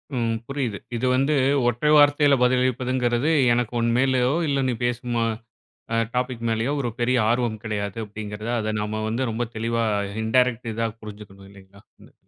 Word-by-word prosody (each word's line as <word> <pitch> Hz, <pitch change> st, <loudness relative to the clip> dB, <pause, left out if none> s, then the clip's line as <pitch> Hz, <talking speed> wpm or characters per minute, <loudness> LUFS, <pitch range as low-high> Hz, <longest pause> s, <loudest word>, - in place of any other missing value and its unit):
ம். 115 Hz, -2 st, 0 dB
புரியுது. 130 Hz, -7 st, -3 dB, 0.2 s
இது 120 Hz, +2 st, -2 dB
வந்து 135 Hz, +4 st, +2 dB, 0.3 s
ஒற்றை 120 Hz, +5 st, +1 dB
வார்த்தையில 145 Hz, -1 st, +5 dB
பதிலளிப்பதுங்கறது, 125 Hz, +1 st, +1 dB, 0.2 s
"எனக்கு 120 Hz, 0 st, -1 dB
உன் 115 Hz, 0 st, +1 dB
மேலயோ, 130 Hz, -1 st, +2 dB, 0.2 s
இல்ல 140 Hz, -1 st, 0 dB
நீ 125 Hz, -, -1 dB
பேசும் 120 Hz, 0 st, -2 dB
அ -, -, +1 dB, 0.7 s
அ -, -, +2 dB, 0.2 s
டாபிக் 125 Hz, -1 st, -2 dB
மேலயோ 115 Hz, +4 st, 0 dB
ஒரு 120 Hz, -3 st, -1 dB
பெரிய 125 Hz, +2 st, +2 dB
ஆர்வம் 120 Hz, -3 st, 0 dB
கெடையாது." 105 Hz, -1 st, -3 dB
அப்படீங்கிறது. 105 Hz, +1 st, -6 dB
அத 110 Hz, -1 st, -2 dB
நம்ம 110 Hz, +1 st, -3 dB
வந்து 120 Hz, +4 st, -1 dB
ரொம்ப 115 Hz, +2 st, -2 dB
தெளிவா 115 Hz, +1 st, -1 dB, 0.4 s
இன்டேரக்ட் 125 Hz, 0 st, +1 dB
இதா 115 Hz, +1 st, -1 dB
புரிஞ்சுக்கணும் 100 Hz, -2 st, -11 dB
இல்லைங்களா? 100 Hz, 0 st, -17 dB, 0.2 s
ம். -, -, -20 dB
120 Hz, 155 wpm, -23 LUFS, 110-125 Hz, 0.7 s, வார்த்தையில